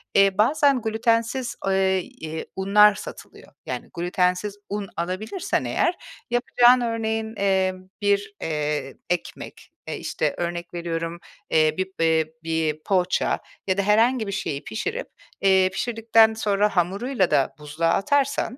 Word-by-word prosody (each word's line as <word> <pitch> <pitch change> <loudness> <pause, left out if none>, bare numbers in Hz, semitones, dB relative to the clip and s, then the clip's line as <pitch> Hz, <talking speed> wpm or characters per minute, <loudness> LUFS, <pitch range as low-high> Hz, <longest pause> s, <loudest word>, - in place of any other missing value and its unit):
Eee, 195 -1 +4
bazen 280 +2 +3
glütensiz, 230 +3 0
eee, 190 -1 +2
eee, 160 -2 -7
unlar 205 +2 +5
satılıyor. - - -11
Yani, - - -5
glütensiz 180 +3 0
un 205 -1 -4
alabilirsen 185 - -2
eğer 355 - +1 0.4
yapacağın 245 +1 +4
örneğin, 225 -1 -2
eee, 190 -1 +2 0.3
bir, 200 0 +1
eee, 150 -3 -2
ekmek, 180 -1 -5 0.2
eee, - - -4
işte, - - -2
örnek 175 0 -4
veriyorum, 170 0 -4 0.3
eee, 155 -1 +3
bir, 190 0 -1
eee, 160 -1 +2
bir 160 -1 -1
poğaça 185 -2 +1 0.3
ya 190 0 +1
da 200 - +3
herhangi 225 +3 +3
bir 200 - -3
şeyi 145 -6 -3
pişirip, 110 - -4 0.3
eee, 190 -1 +4
pişirdikten 225 0 +3
sonra 210 -1 0
hamuruyla 190 +4 +1
da 135 - +2
buzluğa 155 +3 -1
atarsan 275 +2 0
195 Hz, 130 wpm, -24 LUFS, 170-220 Hz, 0.4 s, unlar